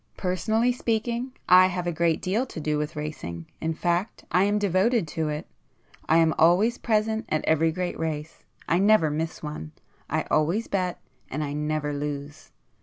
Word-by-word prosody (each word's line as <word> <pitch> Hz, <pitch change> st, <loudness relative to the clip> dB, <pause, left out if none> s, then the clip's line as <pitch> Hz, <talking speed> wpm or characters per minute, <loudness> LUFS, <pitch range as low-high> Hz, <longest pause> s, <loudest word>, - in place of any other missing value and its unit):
Personally 220 Hz, +6 st, +1 dB
speaking 235 Hz, +1 st, -1 dB, 0.2 s
I 185 Hz, +1 st, +8 dB
have 180 Hz, -1 st, -3 dB
a 175 Hz, -, 0 dB
great 165 Hz, 0 st, +1 dB
deal 215 Hz, +8 st, 0 dB
to 175 Hz, -, -7 dB
do 150 Hz, -1 st, -1 dB
with 150 Hz, +1 st, -3 dB
racing,—in 150 Hz, -, -5 dB
fact 175 Hz, +5 st, -1 dB
I 185 Hz, +2 st, +4 dB
am 205 Hz, +1 st, +2 dB
devoted 205 Hz, +1 st, +2 dB
to 160 Hz, 0 st, -2 dB
it. 150 Hz, +1 st, -4 dB, 0.6 s
I 160 Hz, -, +5 dB
am 165 Hz, -1 st, +4 dB
always 190 Hz, +9 st, +4 dB
present 220 Hz, 0 st, 0 dB
at 155 Hz, -, 0 dB
every 160 Hz, +1 st, +3 dB
great 180 Hz, +1 st, -3 dB
race,—I 160 Hz, +2 st, -3 dB
never 200 Hz, -6 st, +4 dB
miss 160 Hz, +2 st, -3 dB
one; 150 Hz, -, -6 dB, 0.4 s
I -, -, 0 dB
always 170 Hz, +9 st, +2 dB
bet, 185 Hz, -2 st, -1 dB, 0.3 s
and 155 Hz, -, -2 dB
I 145 Hz, -1 st, -3 dB
never 150 Hz, 0 st, -1 dB
lose! 145 Hz, 0 st, -5 dB
170 Hz, 165 wpm, -26 LUFS, 150-205 Hz, 0.6 s, I